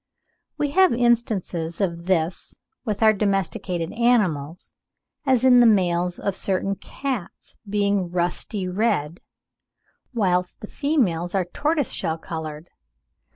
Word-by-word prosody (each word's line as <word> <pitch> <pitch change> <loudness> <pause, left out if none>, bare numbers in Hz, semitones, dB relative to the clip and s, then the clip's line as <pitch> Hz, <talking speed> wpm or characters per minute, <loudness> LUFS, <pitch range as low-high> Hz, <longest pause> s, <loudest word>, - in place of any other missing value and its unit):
We 290 -1 -1
have 375 -1 +5
instances 220 -9 0
of 170 -3 -2
this 175 -2 -1 0.3
with 215 -2 -2
our 220 0 +6
domesticated 195 -4 -1
animals, 185 -10 0 0.5
as 260 -1 +3
in 250 -1 +7
the 240 - +7
males 180 -4 +2
of 200 -2 -2
certain 195 +1 0
cats 250 -1 -6
being 200 -3 +1
rusty 180 +2 -2
red, 180 -5 0 0.9
whilst 180 -6 0
the - - -6
females 205 - 0
are 190 -2 +1
tortoise 295 - -1
shell 160 - -1
coloured. 160 0 -7
195 Hz, 115 wpm, -23 LUFS, 175-235 Hz, 0.9 s, in